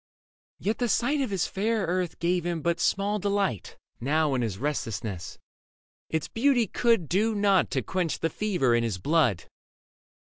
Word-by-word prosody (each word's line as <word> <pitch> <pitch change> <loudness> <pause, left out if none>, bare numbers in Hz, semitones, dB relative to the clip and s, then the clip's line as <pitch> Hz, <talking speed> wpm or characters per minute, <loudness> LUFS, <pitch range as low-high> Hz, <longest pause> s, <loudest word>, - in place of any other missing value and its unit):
Yet 215 +2 -2
the 245 -2 0
sight 240 +6 +2
Leda 275 - +1
Of - - -7
his 190 -4 0
fair 215 +1 -1
earth 180 0 -1
gave 175 0 0
him 170 -3 -3
but 170 0 0
small 205 +2 +1
delight 200 - -1 0.2
Now 150 +3 +1
in 130 - 0
his 110 -5 -2
restlessness: 110 - -4 0.7
its 160 -1 -1
beauty 245 0 +2
could 230 -7 +1
Do 215 +6 +1
nought 200 -2 +3
to - - -1
quench 180 -4 -1
the 165 - -1
fever 180 - +1
in 120 - +3
his 110 -5 -2
blood. 125 - +2
175 Hz, 170 wpm, -27 LUFS, 145-205 Hz, 0.7 s, nought